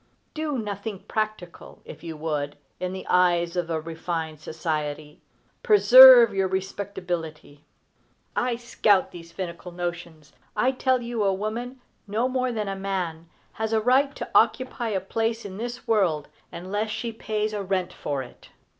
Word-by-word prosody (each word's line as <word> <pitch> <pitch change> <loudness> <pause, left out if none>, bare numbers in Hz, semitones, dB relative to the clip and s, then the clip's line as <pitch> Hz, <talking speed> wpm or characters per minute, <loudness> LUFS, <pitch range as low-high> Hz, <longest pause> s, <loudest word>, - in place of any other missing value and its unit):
Do 305 -3 -2
nothing 205 -2 -5
practical, 215 -5 -5
if - - -11
you 165 -2 -6
would, 150 -2 -3 0.2
in 180 0 -3
the 190 0 -7
eyes 175 -1 +2
of 175 -2 -2 0.2
refined 160 -1 -4
society, 150 -1 -4 0.4
preserve 255 - +9
your 195 -1 +1
respectability. 180 -6 -5 0.7
I 245 -1 0
scout 215 -4 +2
these 170 -1 -11
finical 175 -1 -6
notions. 170 -3 -6 0.2
I 255 - +2
tell 260 -1 +1
you 235 -2 -2
a 195 - +3
woman, 230 +6 -4 0.3
no 220 +5 0
more 255 -1 -1
than 215 -3 -3
a 195 - -3
man, 180 -4 -4 0.2
has 220 0 -3
a 220 - +3
right 265 +5 +2
to - - -5
occupy 240 +1 +2
a 200 -3 0
place 225 +4 -2
in 190 -1 -7
this 240 +2 -6
world 180 -10 +1 0.2
unless 195 +5 -3
she 230 +2 -3
pays 215 -1 -3
a 205 - -2
rent 185 -2 -2
for 140 -2 -3
it. 120 - -15
195 Hz, 150 wpm, -25 LUFS, 170-230 Hz, 0.7 s, preserve